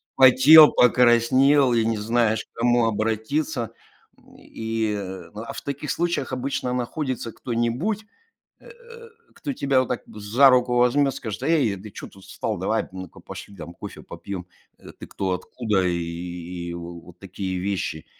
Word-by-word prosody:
Потел, 135 Hz, +4 st, +8 dB
покраснел 125 Hz, +3 st, +4 dB
и 115 Hz, -1 st, +2 dB
не 115 Hz, -1 st, 0 dB
знаешь, 110 Hz, 0 st, +1 dB
к -, -, -18 dB
кому 120 Hz, 0 st, +3 dB
обратиться, 115 Hz, +5 st, -1 dB, 0.5 s
м, -, -, -22 dB
и 110 Hz, -1 st, -3 dB, 0.4 s
А 115 Hz, +2 st, -7 dB
в -, -, -7 dB
таких 140 Hz, +1 st, -4 dB
случаях 170 Hz, -6 st, -1 dB
обычно 130 Hz, -1 st, -2 dB
находится 125 Hz, -1 st, -3 dB
кто-нибудь, 125 Hz, -, -2 dB, 0.6 s
э, -, -, -15 dB, 0.6 s
кто 285 Hz, -, -5 dB
тебя 140 Hz, -, +2 dB
вот 130 Hz, -, -2 dB
так 125 Hz, -, -3 dB
за 110 Hz, +6 st, +3 dB
руку 125 Hz, -1 st, +2 dB
возьмет, 135 Hz, +3 st, +3 dB
скажет: 115 Hz, 0 st, -6 dB
"Эй, 140 Hz, -9 st, +2 dB
ты 105 Hz, +3 st, -11 dB
чё -, -, -9 dB
тут 95 Hz, -1 st, -17 dB
встал? -, -, -4 dB
Давай, -, -, -1 dB
ну-ка, 95 Hz, -2 st, -9 dB
пошли 100 Hz, -, -10 dB
там 85 Hz, 0 st, -9 dB
кофе -, -, -9 dB
попьем. 95 Hz, -3 st, -8 dB, 0.3 s
Э, -, -, -13 dB
ты -, -, -9 dB
кто? 95 Hz, -1 st, -3 dB
Откуда?" 105 Hz, +1 st, -1 dB
И 85 Hz, 0 st, -5 dB
вот 85 Hz, 0 st, -10 dB
такие 95 Hz, -1 st, -5 dB
вещи, 90 Hz, -4 st, -3 dB
115 Hz, 150 wpm, -23 LUFS, 100-130 Hz, 0.6 s, Потел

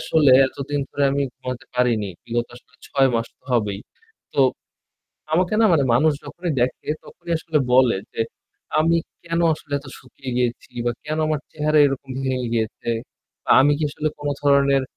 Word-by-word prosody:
আসলে 155 Hz, -4 st, +3 dB, 0.2 s
এতদিন 140 Hz, +2 st, -3 dB
ধরে 140 Hz, -, 0 dB
আমি 140 Hz, 0 st, +1 dB
ঘুমাতে 125 Hz, 0 st, -6 dB
পারিনি, 120 Hz, -5 st, +1 dB, 0.2 s
বিগত 120 Hz, 0 st, -1 dB
আসলে -, -, -20 dB
৬ 135 Hz, -1 st, +3 dB
মাস 115 Hz, 0 st, 0 dB
তো -, -, -48 dB
হবেই। 105 Hz, -4 st, 0 dB, 0.5 s
তো, -, -, +1 dB, 0.9 s
আমাকে 180 Hz, +5 st, +2 dB
না 225 Hz, -, +5 dB
মানে 145 Hz, -5 st, +4 dB
মানুষ 155 Hz, +6 st, +4 dB
যখনই 170 Hz, +4 st, -4 dB
দেখে 125 Hz, +1 st, -1 dB, 0.2 s
তখনই 170 Hz, -, -7 dB
আসলে 160 Hz, -1 st, 0 dB
বলে 125 Hz, -3 st, +5 dB, 0.2 s
যে -, -, -4 dB, 0.6 s
আমি 165 Hz, +2 st, +3 dB, 0.3 s
কেনো 170 Hz, 0 st, 0 dB
আসলে 150 Hz, -1 st, -14 dB
এত 140 Hz, -, -14 dB
শুকিয়ে 130 Hz, 0 st, -9 dB
গিয়েছি 125 Hz, -1 st, -1 dB
বা 120 Hz, -, +1 dB
কেনো 155 Hz, +1 st, -2 dB
আমার 155 Hz, -2 st, 0 dB
চেহারা 155 Hz, 0 st, +2 dB
এরকম 135 Hz, -1 st, -4 dB
ভেঙে 130 Hz, -2 st, -1 dB
গিয়েছে? 110 Hz, 0 st, -2 dB, 0.5 s
বা -, -, -4 dB
আমি 145 Hz, +2 st, +5 dB
কি -, -, -3 dB
আসলে 155 Hz, +1 st, -2 dB
কোনো 145 Hz, 0 st, -2 dB
ধরনের 140 Hz, -1 st, +4 dB
140 Hz, 170 wpm, -22 LUFS, 125-155 Hz, 0.9 s, না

